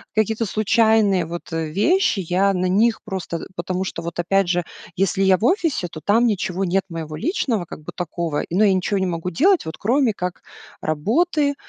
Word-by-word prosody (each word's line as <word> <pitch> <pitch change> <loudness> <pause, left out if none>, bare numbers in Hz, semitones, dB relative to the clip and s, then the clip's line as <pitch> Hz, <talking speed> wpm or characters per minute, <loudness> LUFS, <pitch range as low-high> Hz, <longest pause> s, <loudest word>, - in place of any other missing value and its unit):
какие-то 220 +1 +1
случайные 215 -3 +3
вот, 170 +2 -7
э, 165 -1 -2
вещи. 215 - +2
Я 190 +3 +1
на 185 0 -1
них 220 +5 +2
просто 185 -3 -4
э, - - -8
потому 185 0 -2
что 180 - -5
вот, 170 0 -6
опять 195 +2 +2
же, 175 0 +1 0.3
если 195 +1 0
я 190 -1 +5
в - - -8
офисе, 315 - +1
то 155 - -8
там 225 +4 +4
ничего 195 -3 -1
нет 190 +2 +1
моего 160 -2 -6
личного 230 - -1
как 155 - -10
бы - - -7
такого, 170 -3 -2
ну, 185 +5 +2
я 210 - +5
и 190 - +4
ничего 190 +2 0
не 190 - 0
могу 175 0 -3
делать, 360 - +3
вот 160 - -6
кроме 245 +1 +2
как 180 -3 -5 0.4
работы, 285 - +1
190 Hz, 200 wpm, -21 LUFS, 175-220 Hz, 0.4 s, я